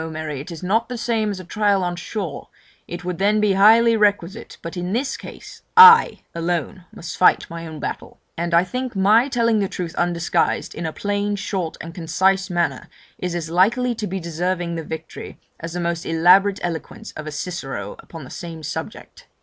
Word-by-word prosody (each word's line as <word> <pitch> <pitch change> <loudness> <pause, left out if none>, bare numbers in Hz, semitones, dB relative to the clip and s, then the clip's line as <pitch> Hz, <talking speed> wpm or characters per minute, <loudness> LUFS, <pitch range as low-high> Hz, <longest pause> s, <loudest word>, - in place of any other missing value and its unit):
Mary 155 -3 -5
it 145 - -8
is 170 0 -8
not 220 +7 0
the 250 - -4
same 225 -2 0
as 200 -2 -4
a - - -8
trial 205 0 +1
on 175 0 -2
shore; 175 -2 -6 0.4
it 175 0 -7
would 180 -1 -4
then 205 +2 +3
be 210 -2 +2
highly 225 +4 +6
requisite; 205 -1 0
but, 165 +2 -6
in 180 +1 -3
this 265 +4 -1
case, - - -11 0.2
I 455 +1 +9
alone 175 +2 -3
must 165 - -8
fight 180 - +4
my 165 0 -6
own 155 -1 -8
battle; - - -6 0.2
and 170 0 -1
I 170 - +5
think 250 +5 -5
my 210 +6 +4
telling 230 -4 +2
the 195 -2 -1
truth 175 -2 -5
undisguised, 175 -1 0
in 165 0 -4
a - - -3
plain, 205 +3 -2
short, 190 -4 -4
and 165 0 -8
concise 190 +3 +1
manner, 175 -1 -1 0.3
is 180 -1 -3
as 165 -2 -4
likely 235 +8 +2
to 215 -2 -4
be 190 +1 -3
deserving 170 +1 -2
the 165 -1 -4
victory, 160 +1 -8 0.2
as 165 0 -6
the 180 - -3
most 170 -1 -2
elaborate 185 +5 +4
eloquence 175 +6 -5
of 155 0 -8
a - - -4
Cicero 135 - -5
upon 165 -3 -11
the 130 - -12
same 165 -3 -8
subject.' - - -7
180 Hz, 195 wpm, -21 LUFS, 170-205 Hz, 0.4 s, I